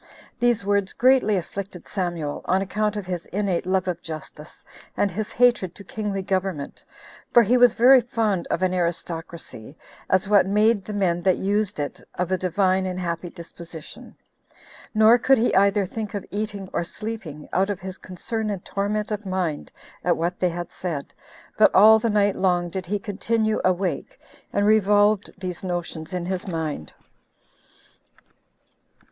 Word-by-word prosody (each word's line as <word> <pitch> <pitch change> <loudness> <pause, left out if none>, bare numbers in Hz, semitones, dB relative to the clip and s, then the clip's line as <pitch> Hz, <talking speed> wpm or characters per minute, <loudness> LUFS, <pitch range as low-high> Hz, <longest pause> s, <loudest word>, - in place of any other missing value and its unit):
These 240 -3 +2
words 200 -1 +1
greatly 250 -5 +4
afflicted 190 +1 -6
Samuel, 175 -6 -3
on 190 - +2
account 210 +2 -1
of 205 -2 -4
his 180 -2 -5
innate 190 -3 -1
love 185 0 +1
of 175 -1 -2
justice, 155 0 -9 0.3
and 200 - +1
his 210 +4 -4
hatred 240 -7 +2
to 200 - -11
kingly 200 -1 -4
government, 185 -6 -3 0.5
for 240 - +7
he 235 +4 +3
was 245 -2 +5
very 255 +2 +7
fond 220 -6 -1
of 185 - -1
an 185 0 +1
aristocracy, 170 -6 -4 0.3
as 190 +1 +2
what 200 -2 +4
made 210 +1 +3
the 215 - -6
men 180 -4 +1
that 185 0 +2
used 205 -1 -1
it 145 - -4
of 180 0 -2
a 185 - +2
divine 185 +1 +1
and 185 0 -4
happy 170 0 -3
disposition; 170 -2 -11 0.8
nor 220 +3 +6
could 270 +2 +4
he 235 +2 +1
either 200 +1 +3
think 215 +2 -5
of 200 - -4
eating 205 -1 -4
or - - 0
sleeping, 185 -6 -7
out 195 +2 +2
of 200 -2 -2
his 190 0 -7
concern 215 +4 -4
and 195 -3 -4
torment 210 +2 -2
of 210 0 -3
mind 185 -6 -3 0.3
at 175 -1 +2
what 170 +2 -2
they 180 - +2
had 175 0 -5
said, 165 -6 -5 0.5
but - - +7
all 220 +3 +8
the 230 +1 0
night 205 -1 +2
long 175 -2 +1
did 185 0 -5
he 205 +3 0
continue 220 +2 -1
awake 185 - -1 0.3
and 200 - +1
revolved 205 -1 +4
these 185 -1 -5
notions 175 -3 -4
in 180 -2 -3
his 185 +2 -3
mind. 160 - -4
190 Hz, 165 wpm, -24 LUFS, 175-210 Hz, 0.8 s, all